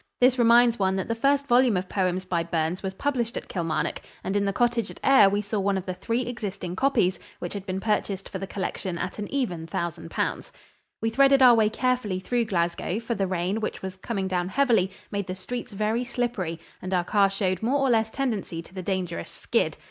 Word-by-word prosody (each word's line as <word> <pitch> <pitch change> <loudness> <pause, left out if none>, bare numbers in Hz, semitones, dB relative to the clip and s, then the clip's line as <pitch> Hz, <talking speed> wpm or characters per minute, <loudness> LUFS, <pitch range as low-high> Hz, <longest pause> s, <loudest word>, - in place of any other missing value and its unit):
This 250 0 +4
reminds 235 0 +5
one 190 -1 +2
that 190 - -2
the 230 - 0
first 275 +4 +2
volume 245 -5 +4
of 185 +1 -3
poems 185 -1 0
by 175 -2 0
Burns 165 +1 -1
was 190 -1 -4
published 245 -2 -1
at - - -6
Kilmarnock, 165 -4 -2 0.2
and 190 - -2
in 200 0 +2
the 200 - +1
cottage 235 0 +1
at - - -11
Ayr 265 -8 +7
we 205 +1 0
saw 210 +1 -2
one 195 0 +1
of 190 - -4
the 185 - -3
three 230 +7 -1
existing 200 -7 -5
copies, 225 -7 +2 0.2
which 175 - -5
had 200 -1 -6
been 185 0 -2
purchased 200 -2 -1
for 190 - -6
the 195 - -5
collection 190 -2 -3
at - - -4
an 205 - -5
even 180 -13 -2
thousand 165 - -4
pounds. - - -2 0.5
We 225 - +1
threaded 275 +2 +5
our 250 -1 +9
way 220 -2 +4
carefully 235 -5 0
through 235 +5 0
Glasgow, 175 0 -1
for 235 +1 -3
the 195 -4 -1
rain, 185 +4 -1
which 215 - -4
was 190 -1 -5
coming 195 0 -3
down 180 -1 -1
heavily, 225 -6 +3 0.2
made 200 -2 -2
the 185 - -4
streets 240 +7 -6
very 215 +4 0
slippery, 240 -10 -2 0.2
and 185 0 -2
our 175 - +2
car 200 +2 +3
showed 190 -2 -1
more 250 +6 +2
or 270 -2 +2
less 220 -1 +2
tendency 220 -10 -3
to 180 - -13
the 190 - -5
dangerous 180 - -3
"skid." - - -1
200 Hz, 220 wpm, -26 LUFS, 185-235 Hz, 0.5 s, our